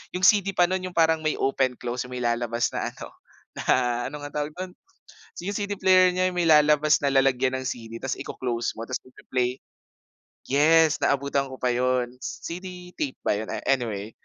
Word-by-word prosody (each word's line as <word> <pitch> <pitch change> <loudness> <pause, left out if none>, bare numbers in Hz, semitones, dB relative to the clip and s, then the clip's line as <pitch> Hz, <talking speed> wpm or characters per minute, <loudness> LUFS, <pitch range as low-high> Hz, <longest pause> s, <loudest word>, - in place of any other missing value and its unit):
yung 180 - -3
CD 195 -1 +4
pa 175 - +5
no'n 185 +1 -2
yung 180 - -17
parang 160 -1 +4
may 155 -1 0
open 130 -1 0
close 125 +1 -4
yung 125 - -8
may 125 - -4
lalabas 120 0 0
na - - -2
ano - - -10 0.5
na 120 -1 +1
ano 150 - -8
ngang 145 0 -8
tawag 150 0 -3
do'n? 185 0 -6 0.7
Yung 200 +1 -3
CD 205 0 -3
player 185 -1 +5
niya 185 0 +1
may 175 -1 0
lalabas 150 0 +5
na 140 - +2
lalagyan 135 -1 +3
ng 130 - -7
CD 115 -2 -6
ta's 135 - -3
iko-close 120 -2 -3
mo - - -4
tas 130 - -3
magpe-play. 130 -1 -3 0.8
Yes, 155 +3 +4
naabutan 140 0 0
ko 130 - -8
pa 125 -1 0
yun, 125 0 0
CD 180 +4 -7
tape 135 -3 -2
ba - - +1
yun, 105 +1 -2
a - - -5
anyway. 110 -6 -1
135 Hz, 190 wpm, -25 LUFS, 125-170 Hz, 0.8 s, pa